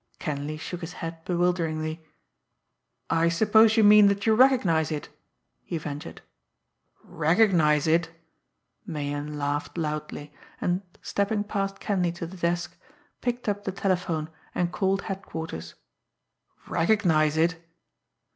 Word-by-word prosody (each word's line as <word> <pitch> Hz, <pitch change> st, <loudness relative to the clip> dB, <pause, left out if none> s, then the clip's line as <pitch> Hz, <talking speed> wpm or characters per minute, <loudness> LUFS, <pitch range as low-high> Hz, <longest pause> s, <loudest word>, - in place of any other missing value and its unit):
Kenleigh 150 Hz, +1 st, -4 dB
shook 175 Hz, +3 st, -6 dB
his 165 Hz, 0 st, -6 dB
head 165 Hz, -1 st, -7 dB
bewilderingly. 165 Hz, -3 st, -1 dB, 1.1 s
"I 165 Hz, 0 st, +3 dB
suppose 220 Hz, +5 st, +4 dB
you 220 Hz, -, +6 dB
mean 210 Hz, 0 st, +8 dB
that 200 Hz, 0 st, 0 dB
you 220 Hz, -, +4 dB
recognise 215 Hz, -, +4 dB
it?" 150 Hz, -1 st, -4 dB, 0.5 s
he 170 Hz, -, -4 dB
ventured. 150 Hz, -2 st, -7 dB, 0.8 s
"Recognize 160 Hz, -3 st, +3 dB
it!" 165 Hz, +1 st, +2 dB, 0.7 s
Meighan 150 Hz, -4 st, -4 dB
laughed 145 Hz, +3 st, -2 dB
low, 155 Hz, -2 st, -1 dB, 0.6 s
and, 180 Hz, +2 st, 0 dB, 0.2 s
stepping 205 Hz, +1 st, 0 dB
past 195 Hz, -2 st, -3 dB
Kenleigh 180 Hz, -4 st, 0 dB
to 170 Hz, -1 st, -6 dB
the 180 Hz, +3 st, -10 dB
desk, 170 Hz, 0 st, -1 dB, 0.5 s
picked 245 Hz, -1 st, -2 dB
up 205 Hz, 0 st, -1 dB
the 190 Hz, -, -2 dB
telephone, 180 Hz, -5 st, -1 dB, 0.2 s
and 175 Hz, -1 st, 0 dB
called 195 Hz, 0 st, 0 dB
Headquarters. 160 Hz, -, -6 dB, 0.9 s
"Recognise 165 Hz, -4 st, +2 dB
it!" 165 Hz, +1 st, +1 dB
170 Hz, 120 wpm, -26 LUFS, 155-195 Hz, 1.1 s, mean